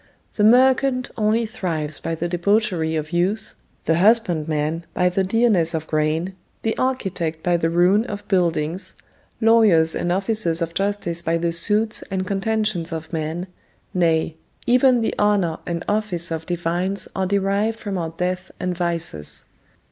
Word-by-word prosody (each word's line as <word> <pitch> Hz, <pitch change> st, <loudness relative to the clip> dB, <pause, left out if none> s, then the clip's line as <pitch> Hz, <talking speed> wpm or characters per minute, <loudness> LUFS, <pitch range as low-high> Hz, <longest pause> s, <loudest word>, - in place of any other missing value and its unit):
The 210 Hz, -, +1 dB
merchant 255 Hz, +2 st, +4 dB
only 220 Hz, +1 st, +1 dB
thrives 160 Hz, -8 st, -2 dB
by 165 Hz, 0 st, -3 dB
the 170 Hz, +2 st, -3 dB
debauchery 175 Hz, -2 st, +1 dB
of 155 Hz, +2 st, -4 dB
youth, 195 Hz, +6 st, -1 dB, 0.3 s
the 160 Hz, 0 st, +2 dB
husband 190 Hz, -6 st, +3 dB
man 155 Hz, +2 st, -1 dB
by 180 Hz, 0 st, +3 dB
the 190 Hz, +2 st, 0 dB
dearness 190 Hz, -5 st, +2 dB
of 160 Hz, -1 st, -3 dB
grain, 155 Hz, +4 st, -1 dB, 0.3 s
the 225 Hz, -, 0 dB
architect 180 Hz, -11 st, -2 dB
by 175 Hz, -1 st, +2 dB
the 165 Hz, -1 st, +1 dB
ruin 180 Hz, +6 st, +3 dB
of 205 Hz, -3 st, -7 dB
buildings, 170 Hz, -2 st, 0 dB, 0.4 s
lawyers 215 Hz, -8 st, +4 dB
and 175 Hz, -, -1 dB
officers 190 Hz, -3 st, 0 dB
of 170 Hz, -1 st, -3 dB
justice 195 Hz, -4 st, -1 dB
by 165 Hz, 0 st, 0 dB
the 170 Hz, 0 st, -1 dB
suits 210 Hz, +6 st, +2 dB
and 190 Hz, -1 st, -2 dB
contentions 200 Hz, -3 st, -1 dB
of 160 Hz, +1 st, -6 dB
men: 160 Hz, +2 st, -3 dB, 0.5 s
nay, 165 Hz, -2 st, +1 dB, 0.3 s
even 250 Hz, 0 st, +4 dB
the 225 Hz, -, 0 dB
honour 200 Hz, -6 st, +1 dB
and 170 Hz, -1 st, -3 dB
office 205 Hz, -6 st, +1 dB
of 160 Hz, 0 st, -4 dB
divines 175 Hz, +3 st, -2 dB
are 190 Hz, -1 st, 0 dB
derived 200 Hz, +3 st, 0 dB
from 200 Hz, -4 st, -4 dB
our 165 Hz, -1 st, -3 dB
death 180 Hz, +2 st, -3 dB
and 180 Hz, -1 st, -2 dB
vices. 170 Hz, -, -2 dB
180 Hz, 155 wpm, -21 LUFS, 165-210 Hz, 0.5 s, merchant